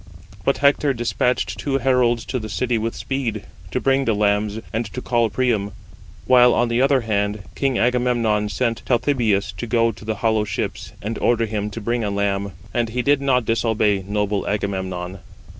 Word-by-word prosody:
But 140 - +2
Hector 140 0 +3
despatched 120 -4 -1
two 135 +3 0
heralds 125 -3 +2
to 130 - -2
the 110 -1 -6
city 115 +5 0
with 115 +1 -3
speed, 120 -6 -3 0.3
to - - -1
bring 135 0 +2
the 115 - +2
lambs, 105 +1 +1
and 115 +2 0
to - - -3
call 120 -2 +1
Priam. 105 -3 0 0.5
While, 125 -1 +6
on 120 - +2
the 115 +1 +1
other 135 -1 +3
hand, 105 -2 -1
king 135 -3 0
Agamemnon 120 -4 +1
sent 115 +3 -1
Talthybius 120 -5 +1
to 120 - -4
go 115 0 +2
to 105 - -14
the 110 0 -2
hollow 110 -1 +3
ships, 105 - -4
and 110 +2 -3
ordered 115 -2 +2
him 105 -1 -2
to 115 +2 -7
bring 120 +2 -1
a 105 - -1
lamb. 100 -1 -1 0.2
And 120 -2 0
he 125 +2 -2
did 145 +1 +3
not 130 -3 +2
disobey 110 -3 +1
noble 105 0 -1
Agamemnon. 95 -2 -3
115 Hz, 180 wpm, -21 LUFS, 105-125 Hz, 0.5 s, While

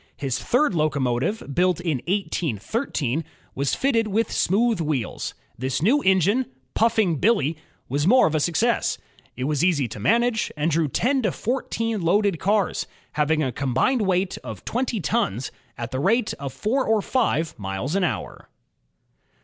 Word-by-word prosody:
His 130 -3 -2
third 250 - +2
locomotive, 145 - 0
built 180 +2 +2
in 165 -5 -1
1813, 165 - -1 0.3
was 140 0 0
fitted 230 -5 +1
with 215 +2 0
GEORGE - - -5
STEPHENSON - - +2
6 - - -6
1 195 - +4
smooth 230 -5 +2
wheels. 130 -8 -2 0.3
This 130 +2 -1
new 270 +10 +4
engine, 195 - +3 0.3
Puffing 220 -7 +2
Billy 190 - +2
y 160 - -25 0.3
was 145 +5 0
more 255 +5 +6
of 160 - +1
a 155 - +2
success. 210 +9 +1 0.4
It 125 - -4
was 150 +3 0
easy 160 -8 +2
to 110 - -8
manage, 230 - +2
and 155 +3 +1
drew 160 0 +2
ten 260 - +1
to 215 -6 +1
fourteen 230 -2 -2
loaded 190 +1 +2
cars, 200 -2 +1 0.2
having 155 +1 +1
a 130 - -1
combined 140 - +1
weight 185 -1 0
of - - -8
twenty 245 -2 -1
tons, 125 - -1 0.3
at 120 0 -5
the 130 - -2
rate 215 - +2
of 140 -1 -4
four 215 - 0
or 220 -4 +1
five 190 -11 0
miles 95 - -3
an 195 0 +1
hour. 175 - -3
180 Hz, 170 wpm, -24 LUFS, 140-225 Hz, 0.4 s, more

